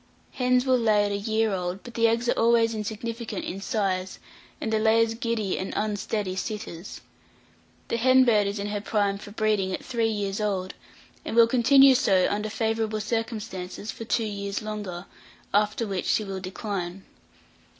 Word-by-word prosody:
Hens 250 Hz, 0 st, +2 dB
will 255 Hz, -1 st, +3 dB
lay 215 Hz, -3 st, +3 dB
at 205 Hz, -, -2 dB
a -, -, 0 dB
year 220 Hz, +1 st, 0 dB
old, 180 Hz, +1 st, -3 dB
but 240 Hz, -, -10 dB
the 230 Hz, 0 st, +3 dB
eggs 230 Hz, +1 st, 0 dB
are -, -, +4 dB
always 230 Hz, 0 st, +3 dB
insignificant 220 Hz, 0 st, -4 dB
in 195 Hz, +2 st, -5 dB
size, 195 Hz, -4 st, -1 dB, 0.4 s
and 220 Hz, -, -2 dB
the 220 Hz, -, +3 dB
layers 225 Hz, +1 st, +3 dB
giddy 225 Hz, -4 st, -2 dB
and 190 Hz, -, -4 dB
unsteady 205 Hz, -2 st, -2 dB
sitters. 190 Hz, -3 st, -6 dB, 0.9 s
The 230 Hz, -, -1 dB
hen 255 Hz, +2 st, +5 dB
bird 210 Hz, -4 st, +3 dB
is 200 Hz, +1 st, -3 dB
in 200 Hz, -, -3 dB
her 205 Hz, 0 st, -3 dB
prime 200 Hz, -2 st, 0 dB
for 205 Hz, -, -10 dB
breeding 210 Hz, -3 st, 0 dB
at -, -, -10 dB
three 230 Hz, -3 st, 0 dB
years 205 Hz, -1 st, -2 dB
old, 190 Hz, -3 st, -1 dB, 0.5 s
and -, -, -4 dB
will 235 Hz, -1 st, +8 dB
continue 265 Hz, +3 st, +6 dB
so, 190 Hz, -7 st, +3 dB
under 210 Hz, +1 st, -2 dB
favourable 220 Hz, 0 st, -1 dB
circumstances, 215 Hz, -3 st, -4 dB
for -, -, -8 dB
two 225 Hz, 0 st, 0 dB
years 200 Hz, -1 st, -4 dB
longer; 205 Hz, -4 st, -5 dB, 0.5 s
after 210 Hz, +2 st, +2 dB
which 195 Hz, -4 st, -3 dB
she 215 Hz, -, +2 dB
will 195 Hz, -2 st, -5 dB
decline. 190 Hz, -1 st, -5 dB
215 Hz, 170 wpm, -26 LUFS, 200-230 Hz, 0.9 s, will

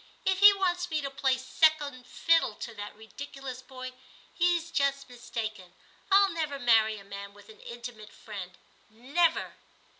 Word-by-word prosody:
If 380 Hz, 0 st, +2 dB
he 405 Hz, +1 st, +10 dB
wants 360 Hz, -2 st, 0 dB
me 315 Hz, -2 st, 0 dB
to 275 Hz, -1 st, -4 dB
play 265 Hz, -1 st, +1 dB
second 285 Hz, -1 st, +1 dB
fiddle 330 Hz, -9 st, +2 dB
to 235 Hz, -, -7 dB
that 205 Hz, -1 st, -8 dB
ridiculous 260 Hz, +3 st, -8 dB
boy, 255 Hz, -1 st, -8 dB, 0.4 s
he's 345 Hz, -1 st, +1 dB
just 275 Hz, -2 st, 0 dB
mis 245 Hz, -2 st, -13 dB
taken; 215 Hz, -6 st, -5 dB, 0.4 s
I'll 395 Hz, 0 st, +6 dB
never 310 Hz, -4 st, -2 dB
marry 225 Hz, -4 st, +4 dB
a 200 Hz, -, -11 dB
man 200 Hz, 0 st, -9 dB
with 205 Hz, +1 st, -17 dB
an 215 Hz, -, -14 dB
intimate 235 Hz, -3 st, -9 dB
friend. 190 Hz, -4 st, -9 dB, 0.3 s
Never.' 275 Hz, +10 st, 0 dB
260 Hz, 155 wpm, -29 LUFS, 220-315 Hz, 0.4 s, he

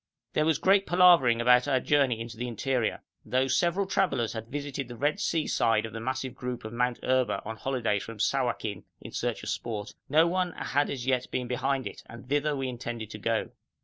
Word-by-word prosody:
There 155 Hz, -, +2 dB
was 160 Hz, -3 st, +3 dB
great 195 Hz, +3 st, +3 dB
palavering 175 Hz, -10 st, +6 dB
about 125 Hz, +2 st, +5 dB
our 135 Hz, -2 st, +3 dB
journey 135 Hz, -4 st, +2 dB
into 115 Hz, 0 st, -6 dB
the 120 Hz, +2 st, -4 dB
interior. 120 Hz, 0 st, -1 dB, 0.2 s
Though 130 Hz, +1 st, +1 dB
several 170 Hz, +8 st, +1 dB
travellers 185 Hz, -, 0 dB
had 110 Hz, -1 st, -6 dB
visited 140 Hz, 0 st, -4 dB
the 120 Hz, -, -8 dB
Red 145 Hz, +5 st, 0 dB
Sea 160 Hz, -2 st, 0 dB
side 115 Hz, -1 st, +2 dB
of 110 Hz, -, -8 dB
the 115 Hz, -, -5 dB
massive 130 Hz, +2 st, -3 dB
group 125 Hz, -2 st, -5 dB
of 110 Hz, -, -6 dB
Mount 125 Hz, 0 st, 0 dB
Erba 130 Hz, -1 st, +1 dB
on 110 Hz, +1 st, -5 dB
holidays 115 Hz, -6 st, -1 dB
from 115 Hz, -1 st, -8 dB
Sawakin 115 Hz, -5 st, -1 dB, 0.2 s
in -, -, -10 dB
search -, -, -2 dB
of -, -, -4 dB
sport, 105 Hz, -3 st, -4 dB, 0.2 s
no 155 Hz, +4 st, +5 dB
one 180 Hz, 0 st, 0 dB
had 145 Hz, +1 st, 0 dB
as 125 Hz, -3 st, -4 dB
yet 130 Hz, -1 st, 0 dB
been 125 Hz, -1 st, -2 dB
behind 130 Hz, +2 st, -1 dB
it, -, -, -7 dB
and 115 Hz, +2 st, -11 dB
thither 145 Hz, +2 st, +1 dB
we 135 Hz, -1 st, -2 dB
intended 120 Hz, -3 st, -5 dB
to 105 Hz, -, -7 dB
go. 115 Hz, +1 st, -1 dB
125 Hz, 210 wpm, -28 LUFS, 115-145 Hz, 0.2 s, palavering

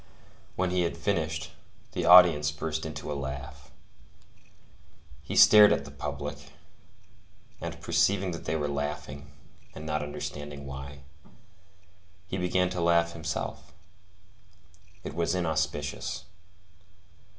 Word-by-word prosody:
When 90 Hz, 0 st, 0 dB
he 90 Hz, 0 st, +1 dB
had 85 Hz, -, -1 dB
finished, 80 Hz, -5 st, -2 dB, 0.4 s
the -, -, -2 dB
audience 85 Hz, -5 st, +8 dB
burst 80 Hz, +1 st, -4 dB
into 75 Hz, -1 st, -6 dB
a -, -, -1 dB
laugh. 65 Hz, -1 st, -7 dB, 1.5 s
He -, -, -6 dB
stared 105 Hz, -1 st, +8 dB
at 70 Hz, -, 0 dB
the 70 Hz, -, -10 dB
public, 70 Hz, 0 st, -6 dB, 1.1 s
and, 85 Hz, 0 st, -5 dB
perceiving 90 Hz, +3 st, +1 dB
that 85 Hz, -, -7 dB
they -, -, -1 dB
were 75 Hz, -2 st, -1 dB
laughing, 70 Hz, 0 st, -5 dB, 0.4 s
and 80 Hz, -, -8 dB
not 75 Hz, -1 st, -1 dB
understanding 75 Hz, -1 st, -6 dB
why, 70 Hz, +1 st, -8 dB, 1.2 s
he 95 Hz, +1 st, -4 dB
began 90 Hz, 0 st, +1 dB
to 90 Hz, -1 st, -2 dB
laugh 85 Hz, 0 st, +3 dB
himself. 80 Hz, -2 st, -5 dB, 1.3 s
It -, -, -6 dB
was 85 Hz, +1 st, 0 dB
inauspicious. 80 Hz, -4 st, -2 dB
80 Hz, 115 wpm, -28 LUFS, 70-85 Hz, 1.5 s, audience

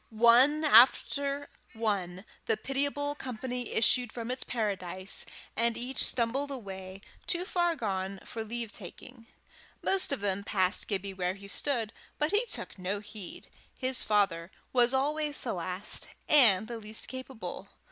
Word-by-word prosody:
One 240 Hz, +7 st, +5 dB
after 280 Hz, +2 st, +4 dB, 0.3 s
one 200 Hz, -4 st, -2 dB, 0.2 s
the 220 Hz, -, +2 dB
pitiable 285 Hz, +4 st, -1 dB
company 250 Hz, -2 st, -5 dB
issued 245 Hz, +1 st, +3 dB
from 235 Hz, 0 st, -5 dB
its 255 Hz, -, -2 dB
paradise, 195 Hz, -4 st, -1 dB, 0.3 s
and 235 Hz, 0 st, +1 dB
each 250 Hz, +2 st, +2 dB
stumbled 260 Hz, +4 st, +1 dB
away, 195 Hz, -7 st, -7 dB, 0.3 s
too 355 Hz, 0 st, 0 dB
far 345 Hz, -2 st, +1 dB
gone 195 Hz, -5 st, -3 dB
for 225 Hz, -, -5 dB
leave 230 Hz, 0 st, -5 dB
taking. 230 Hz, +5 st, -10 dB, 0.6 s
Most 385 Hz, -4 st, +4 dB
of 275 Hz, -, -1 dB
them 200 Hz, -1 st, -1 dB
passed 190 Hz, -1 st, +2 dB
Gibbie 200 Hz, -1 st, -2 dB
where 185 Hz, 0 st, -2 dB
he 200 Hz, 0 st, -11 dB
stood, 230 Hz, 0 st, -1 dB, 0.2 s
but 300 Hz, +2 st, 0 dB
he 430 Hz, +4 st, +2 dB
took -, -, -3 dB
no 190 Hz, +3 st, -2 dB
heed; 205 Hz, -3 st, -8 dB, 0.3 s
his 255 Hz, -1 st, 0 dB
father 195 Hz, -5 st, +1 dB, 0.2 s
was 245 Hz, -1 st, +5 dB
always 295 Hz, +2 st, 0 dB
the 240 Hz, -, -3 dB
last 185 Hz, +3 st, -3 dB, 0.2 s
and 220 Hz, -8 st, +6 dB
the 235 Hz, -1 st, -6 dB
least 215 Hz, 0 st, -5 dB
capable. 260 Hz, -2 st, -7 dB
230 Hz, 145 wpm, -30 LUFS, 200-265 Hz, 0.6 s, and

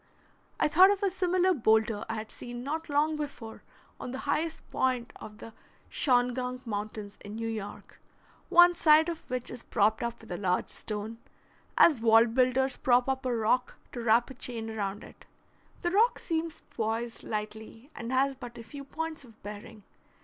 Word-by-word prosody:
I -, -, +4 dB
thought 360 Hz, +6 st, +7 dB
of 405 Hz, 0 st, 0 dB
a 395 Hz, -, +2 dB
similar 370 Hz, 0 st, +2 dB
boulder 220 Hz, -5 st, +2 dB
I 225 Hz, -, -2 dB
had 215 Hz, 0 st, -6 dB
seen 240 Hz, 0 st, -8 dB
not 315 Hz, +4 st, -4 dB
long 300 Hz, +2 st, +2 dB
before 280 Hz, -7 st, -7 dB, 0.4 s
on -, -, -6 dB
the 260 Hz, -, -5 dB
highest 320 Hz, +3 st, -1 dB
point 255 Hz, -2 st, 0 dB
of 210 Hz, 0 st, -11 dB
the 225 Hz, 0 st, -11 dB, 0.4 s
Shawangunk 250 Hz, -1 st, 0 dB
Mountains 210 Hz, -1 st, -5 dB
in 205 Hz, +1 st, -8 dB
New 225 Hz, 0 st, -3 dB
York, 215 Hz, -3 st, -7 dB, 0.5 s
one 350 Hz, -1 st, +7 dB
side 315 Hz, -1 st, +5 dB
of 330 Hz, -1 st, -7 dB
which 250 Hz, -1 st, -3 dB
is 245 Hz, -, -7 dB
propped 215 Hz, 0 st, +1 dB
up 235 Hz, 0 st, -3 dB
with 225 Hz, -, -13 dB
a 175 Hz, -, -3 dB
large 185 Hz, -2 st, 0 dB
stone, 215 Hz, +1 st, -5 dB, 0.6 s
as 295 Hz, -9 st, +6 dB
wall 225 Hz, 0 st, +6 dB
builders 255 Hz, +2 st, +1 dB
prop 245 Hz, 0 st, +3 dB
up 265 Hz, -1 st, -1 dB
a 245 Hz, -, 0 dB
rock 235 Hz, +3 st, +1 dB, 0.2 s
to 240 Hz, -, -5 dB
wrap 235 Hz, +3 st, +3 dB
a -, -, -7 dB
chain 230 Hz, -3 st, -3 dB
around 205 Hz, -1 st, -3 dB
it. -, -, -15 dB, 0.5 s
The 345 Hz, -, 0 dB
rock 445 Hz, +6 st, +4 dB
seems 330 Hz, -1 st, -3 dB
poised 225 Hz, +1 st, -2 dB
lightly, 220 Hz, +4 st, -6 dB
and 235 Hz, +1 st, -5 dB
has 270 Hz, +1 st, +2 dB
but 245 Hz, -2 st, -10 dB
a 230 Hz, -, -8 dB
few 280 Hz, +5 st, -9 dB
points 315 Hz, +1 st, -5 dB
of 225 Hz, -3 st, -18 dB
bearing. 210 Hz, +1 st, -9 dB
245 Hz, 180 wpm, -29 LUFS, 220-290 Hz, 0.6 s, thought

